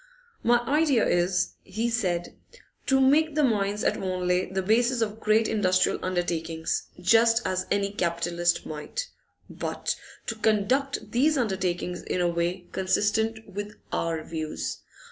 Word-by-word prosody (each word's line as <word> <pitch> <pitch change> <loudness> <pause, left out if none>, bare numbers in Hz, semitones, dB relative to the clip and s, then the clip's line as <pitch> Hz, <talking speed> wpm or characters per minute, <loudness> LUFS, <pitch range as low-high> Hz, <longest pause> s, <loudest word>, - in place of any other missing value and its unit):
'My 240 +1 +4
idea 280 -1 +2
is,' 180 +1 +1
he 220 +5 -2
said, 185 -7 -1 0.5
'to 270 0 +4
make 295 +3 +4
the 305 - +3
mines 210 -4 +1
at - - +1
Wanley 180 -1 0
the 190 0 -1
basis 235 +5 +2
of 220 -1 -1
great 215 +1 +3
industrial 185 -3 +2
undertakings, 165 -3 -2
just 230 +5 +4
as 185 0 -1
any 200 0 +1
capitalist 175 -2 0
might, 320 - -5 0.4
but - - -3 0.3
to - - -2
conduct 225 +6 0
these 290 +5 +3
undertakings 185 -6 -1
in - - -3
a 175 - +2
way 175 +1 -1
consistent 220 +4 0
with 205 +2 -6 0.2
our 165 -1 -1
views. 155 - -4
200 Hz, 135 wpm, -26 LUFS, 175-230 Hz, 0.5 s, My